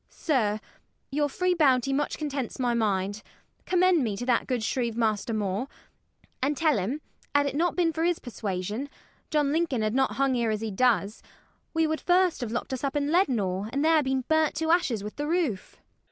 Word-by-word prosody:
DOLL. -, -, -45 dB
Sir, 220 Hz, -9 st, 0 dB, 0.5 s
your 290 Hz, +1 st, +1 dB
free 365 Hz, +5 st, +1 dB
bounty 270 Hz, -5 st, +3 dB
much 290 Hz, +2 st, -1 dB
contents 280 Hz, -5 st, -3 dB
my 245 Hz, -2 st, +1 dB
mind. 205 Hz, -2 st, 0 dB, 0.5 s
Commend 365 Hz, -4 st, +3 dB
me 210 Hz, -4 st, -2 dB
to 245 Hz, -, -4 dB
that 245 Hz, -2 st, +1 dB
good 250 Hz, -4 st, -1 dB
shrieve 235 Hz, -1 st, -1 dB
Master 220 Hz, 0 st, 0 dB
More, 210 Hz, +2 st, -1 dB, 0.7 s
And 285 Hz, +2 st, 0 dB
tell 310 Hz, -8 st, +3 dB
him, 245 Hz, +12 st, -3 dB, 0.3 s
had't 285 Hz, -1 st, +3 dB
not 340 Hz, +5 st, +1 dB
been 335 Hz, -3 st, +2 dB
for 320 Hz, -, -1 dB
his 345 Hz, 0 st, +2 dB
persuasion, 210 Hz, +2 st, -4 dB, 0.4 s
John 295 Hz, -2 st, +1 dB
Lincoln 310 Hz, -8 st, 0 dB
had 215 Hz, 0 st, 0 dB
not 265 Hz, +1 st, +2 dB
hung 275 Hz, -1 st, +1 dB
here 235 Hz, -2 st, +1 dB
as 215 Hz, -1 st, -1 dB
he 220 Hz, -1 st, -3 dB
does: 210 Hz, -2 st, +1 dB, 0.5 s
We 325 Hz, 0 st, +3 dB
would 315 Hz, 0 st, -1 dB
first 360 Hz, -3 st, +2 dB
have 235 Hz, -3 st, -3 dB
locked 240 Hz, +3 st, -3 dB
us 260 Hz, -, -4 dB
up 275 Hz, +1 st, -1 dB
in 290 Hz, 0 st, 0 dB
Leadenhall, 215 Hz, -, +1 dB
And 280 Hz, +3 st, 0 dB
there 320 Hz, -1 st, +5 dB
been 265 Hz, -1 st, 0 dB
burnt 315 Hz, +3 st, +1 dB
to 320 Hz, +1 st, 0 dB
ashes 255 Hz, -, +1 dB
with 210 Hz, -, -7 dB
the 295 Hz, 0 st, -2 dB
roof. 315 Hz, -, -1 dB
SHERIFF. -, -, -26 dB
265 Hz, 200 wpm, -27 LUFS, 220-310 Hz, 0.7 s, there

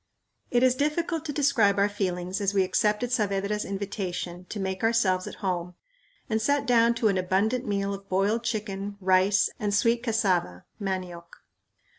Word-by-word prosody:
It 245 Hz, 0 st, +2 dB
is 255 Hz, -1 st, +5 dB
difficult 310 Hz, +4 st, -1 dB
to 300 Hz, -, -2 dB
describe 270 Hz, -9 st, +3 dB
our 200 Hz, +1 st, +4 dB
feelings 185 Hz, -2 st, -3 dB
as 200 Hz, 0 st, 0 dB
we 195 Hz, -, +4 dB
accepted 210 Hz, +5 st, 0 dB
Saavedra's 210 Hz, -2 st, 0 dB
invitation 190 Hz, -3 st, -4 dB
to 210 Hz, -, -5 dB
make 190 Hz, -1 st, -3 dB
ourselves 210 Hz, -5 st, +2 dB
at -, -, -7 dB
home, 180 Hz, -1 st, -2 dB, 0.5 s
and 220 Hz, -3 st, 0 dB
sat 285 Hz, +4 st, +1 dB
down 235 Hz, -2 st, +4 dB
to 230 Hz, -1 st, +1 dB
an 190 Hz, -2 st, +1 dB
abundant 205 Hz, +7 st, 0 dB
meal 200 Hz, -1 st, -1 dB
of 195 Hz, 0 st, -9 dB
boiled 200 Hz, +5 st, +1 dB
chicken, 205 Hz, -3 st, -3 dB
rice, 190 Hz, +1 st, +3 dB
and 205 Hz, -1 st, 0 dB
sweet 230 Hz, +3 st, +2 dB
cassava 190 Hz, -, 0 dB, 0.2 s
(manioc). 185 Hz, -3 st, -4 dB
200 Hz, 160 wpm, -26 LUFS, 190-230 Hz, 0.5 s, is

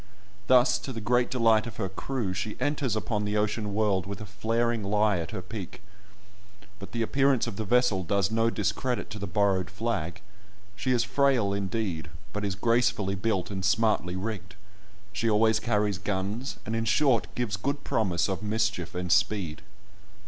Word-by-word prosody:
Thus, 125 Hz, -1 st, +5 dB
to 135 Hz, -, -6 dB
the 115 Hz, -, -5 dB
great 120 Hz, +3 st, +2 dB
delight 115 Hz, -3 st, +3 dB
of 115 Hz, -, -8 dB
her 95 Hz, -, -1 dB
crew, 100 Hz, +1 st, -3 dB
she 105 Hz, +3 st, -4 dB
enters 140 Hz, -6 st, 0 dB
upon 110 Hz, -1 st, -1 dB
the 105 Hz, 0 st, -1 dB
ocean 105 Hz, 0 st, -1 dB
world 100 Hz, -4 st, +1 dB
with 100 Hz, -, -5 dB
a 105 Hz, -, -6 dB
flaring 115 Hz, +3 st, 0 dB
lie 105 Hz, 0 st, +2 dB
at 80 Hz, -, -4 dB
her -, -, -5 dB
peak, -, -, -7 dB, 1.0 s
but 100 Hz, -, -9 dB
the 115 Hz, -1 st, -1 dB
appearance 135 Hz, +1 st, +2 dB
of 115 Hz, -4 st, -5 dB
the 110 Hz, -, -3 dB
vessel 120 Hz, -4 st, +3 dB
does 100 Hz, +3 st, +1 dB
no 115 Hz, +1 st, +3 dB
discredit 115 Hz, +4 st, -1 dB
to 105 Hz, -, -6 dB
the 100 Hz, -, -4 dB
borrowed 95 Hz, -1 st, +1 dB
flag; 95 Hz, -8 st, -3 dB, 0.6 s
she 95 Hz, +6 st, -3 dB
is 120 Hz, -2 st, +3 dB
frail 125 Hz, -5 st, +2 dB
indeed, 95 Hz, -4 st, -2 dB, 0.2 s
but 105 Hz, -, -3 dB
is 100 Hz, -2 st, -1 dB
gracefully 115 Hz, -2 st, +2 dB
built, 100 Hz, 0 st, -1 dB
and 95 Hz, -1 st, -4 dB
smartly 100 Hz, -3 st, +2 dB
rigged; 95 Hz, -1 st, -5 dB, 0.6 s
she 115 Hz, +1 st, 0 dB
always 110 Hz, 0 st, +4 dB
carries 105 Hz, -4 st, 0 dB
guns, 100 Hz, +7 st, -3 dB
and 110 Hz, -, -2 dB
in 115 Hz, 0 st, 0 dB
short, 115 Hz, +2 st, +3 dB
gives 120 Hz, -5 st, -1 dB
good 140 Hz, +9 st, -2 dB
promise 90 Hz, -6 st, +1 dB
of 95 Hz, 0 st, -2 dB
mischief 105 Hz, -5 st, -1 dB
and 90 Hz, -1 st, -2 dB
speed. 95 Hz, -4 st, +1 dB
105 Hz, 175 wpm, -28 LUFS, 95-115 Hz, 1.0 s, Thus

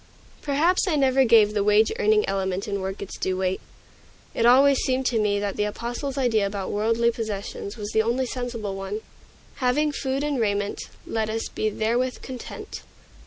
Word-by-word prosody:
Perhaps 320 Hz, +7 st, +2 dB
I 340 Hz, -, +2 dB
never 270 Hz, -2 st, +4 dB
gave 220 Hz, -3 st, +5 dB
the 205 Hz, -1 st, +1 dB
wage 210 Hz, +2 st, +4 dB
earning 430 Hz, -2 st, +3 dB
element 190 Hz, 0 st, -2 dB
in 200 Hz, -1 st, -2 dB
work 190 Hz, +1 st, -4 dB
its 195 Hz, -, -9 dB
due 185 Hz, 0 st, -1 dB
weight. 185 Hz, 0 st, -1 dB, 0.7 s
It 230 Hz, -, +2 dB
always 270 Hz, +2 st, +6 dB
seemed 260 Hz, 0 st, 0 dB
to 240 Hz, -3 st, +1 dB
me 205 Hz, -1 st, +1 dB
that 200 Hz, -1 st, -3 dB
the 210 Hz, -, +1 dB
Apostle's 240 Hz, +6 st, -4 dB
idea 225 Hz, -6 st, +2 dB
about 195 Hz, -1 st, -4 dB
worldly 230 Hz, +3 st, +2 dB
possessions 210 Hz, -1 st, -5 dB
was 205 Hz, -1 st, -5 dB
the 220 Hz, -, +3 dB
only 240 Hz, +4 st, 0 dB
sensible 235 Hz, -5 st, -4 dB
one, 195 Hz, +2 st, -4 dB, 0.6 s
"Having 295 Hz, +4 st, +1 dB
food 270 Hz, -1 st, -2 dB
and 290 Hz, -4 st, 0 dB
raiment, 205 Hz, -1 st, -1 dB, 0.2 s
let 220 Hz, -1 st, -2 dB
us 225 Hz, +1 st, -3 dB
be 215 Hz, -, -1 dB
therewith 240 Hz, +4 st, -1 dB
content." 255 Hz, -2 st, -8 dB
225 Hz, 175 wpm, -24 LUFS, 205-260 Hz, 0.7 s, always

